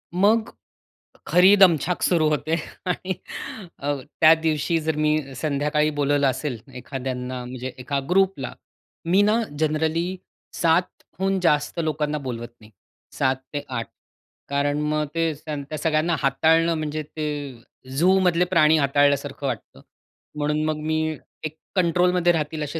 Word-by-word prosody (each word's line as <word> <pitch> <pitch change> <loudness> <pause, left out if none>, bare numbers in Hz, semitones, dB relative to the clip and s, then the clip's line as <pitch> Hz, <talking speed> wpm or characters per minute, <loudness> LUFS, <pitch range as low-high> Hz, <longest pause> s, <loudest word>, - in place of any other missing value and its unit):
मग, 220 +5 +3 0.8
खरी 185 +3 +6
दमछाक 180 -2 +4
सुरू 165 -4 +3
होते. 155 +2 0 0.3
आणि 185 +1 -2 0.7
अ, 145 +1 -1 0.3
त्या 160 0 +9
दिवशी 160 +1 +1
जर 160 0 -1
मी 150 -2 0
संध्याकाळी 150 +2 0
बोलवलं 145 0 +2
असेल, 130 -2 -2 0.2
एखाद्यांना 125 -1 -5
म्हणजे 130 +1 -6
एका 140 +2 -2
ग्रुपला. 190 -7 +1 0.5
मी 185 +4 +4
ना 215 +3 +3 0.2
जनरली 160 +4 0 0.4
7 170 +2 +1 0.2
हून 195 0 +1
जास्त 150 -1 +1
लोकांना 150 -1 -1
बोलवत 120 -4 -5
नाही. 110 0 -17 0.4
7 130 -1 +1 0.2
ते 145 - -3
8 115 -3 -3 0.6
कारण 145 +1 0
मग 150 0 0
ते 165 -1 +1
त्यान 150 -2 -4
त्या 155 - -4
सगळ्यांना 155 +2 +1
हाताळणं, 160 +5 +3
म्हणजे 155 -1 -3
ते 145 -4 -5 0.4
झूमधले 180 +1 +4
प्राणी 160 -3 +4
हाताळल्यासारखं 140 0 +1
वाटतं. 120 -5 -6 0.5
म्हणून 150 +1 0
मग 155 -1 -1
मी 155 0 +1 0.5
एक 155 +1 -5 0.2
कंट्रोलमध्ये 180 0 +3
राहतील, 155 -1 -2
असे 150 +3 -4
155 Hz, 130 wpm, -23 LUFS, 140-170 Hz, 0.8 s, त्या